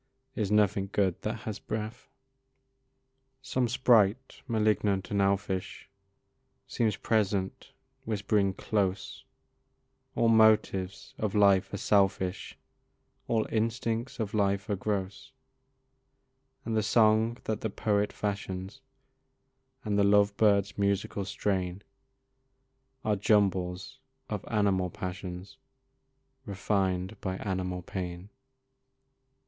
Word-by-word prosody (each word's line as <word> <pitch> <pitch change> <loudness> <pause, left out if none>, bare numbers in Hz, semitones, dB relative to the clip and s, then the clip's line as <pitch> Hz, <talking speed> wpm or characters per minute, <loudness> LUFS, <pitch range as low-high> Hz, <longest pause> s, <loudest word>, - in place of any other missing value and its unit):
Is 105 -4 -1
nothing 100 -2 +2
good 95 -4 0
that 110 +1 -4
has 110 -4 -5
breath? 110 +1 -6 1.3
Some 130 -2 0
sprite, 120 0 +2
malignant 105 -4 +1
and 100 -1 +1
elfish, 95 -1 -1 0.7
Seems 110 -3 0
present 100 -4 -1 0.3
whispering 100 -2 0
close, 100 -3 -2 0.9
"All 115 - +2
motives 110 -4 +3
of 105 -2 -2
life 100 -2 +4
are 100 - -3
selfish, 95 -2 0 0.7
All 110 -2 +1
instincts 115 +2 -1
of 105 -3 -3
life 100 0 +1
are - - +2
gross; 100 +5 -4 1.3
And 115 - -2
the 110 - +3
song 110 +1 +3
that 110 - -3
the 110 - -1
poet 105 0 0
fashions, 100 -2 -4 1.0
And 105 -2 0
the - - +5
love 100 0 +4
bird's 100 -1 +2
musical 100 0 0
strain, 95 -1 -2 1.2
Are 105 -1 +2
jumbles 95 -3 +1 0.3
of - - -3
animal 95 -3 +1
passions, 95 +4 -7 0.9
Refined 95 0 -1
by 95 -1 -2
animal 90 -2 -3
pain." 90 +1 -6
100 Hz, 100 wpm, -29 LUFS, 95-110 Hz, 1.3 s, the